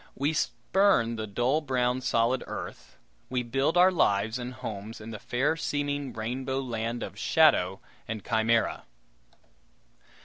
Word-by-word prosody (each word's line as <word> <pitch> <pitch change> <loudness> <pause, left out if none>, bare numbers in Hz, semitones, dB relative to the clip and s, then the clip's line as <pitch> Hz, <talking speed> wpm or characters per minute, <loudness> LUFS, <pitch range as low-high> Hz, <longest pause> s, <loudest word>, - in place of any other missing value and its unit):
We 145 +4 0
spurn 160 - +2
the 110 -1 -4
dull 120 +9 +1
brown 130 -3 0
solid 120 +1 +1
earth; - - -8 0.3
we 125 -1 -1
build 135 +7 0
our 180 +1 +7
lives 110 - +1
and 125 0 -5
homes 110 0 -6
in 110 +1 -8
the 105 - -7
fair 135 +9 0
seeming 145 -3 -2
rainbow 130 +4 -3
land 120 -2 -3
of 100 +1 -8
shadow 105 - +3 0.3
and 110 -2 -5
chimera. 115 0 +1
125 Hz, 135 wpm, -28 LUFS, 110-140 Hz, 0.3 s, our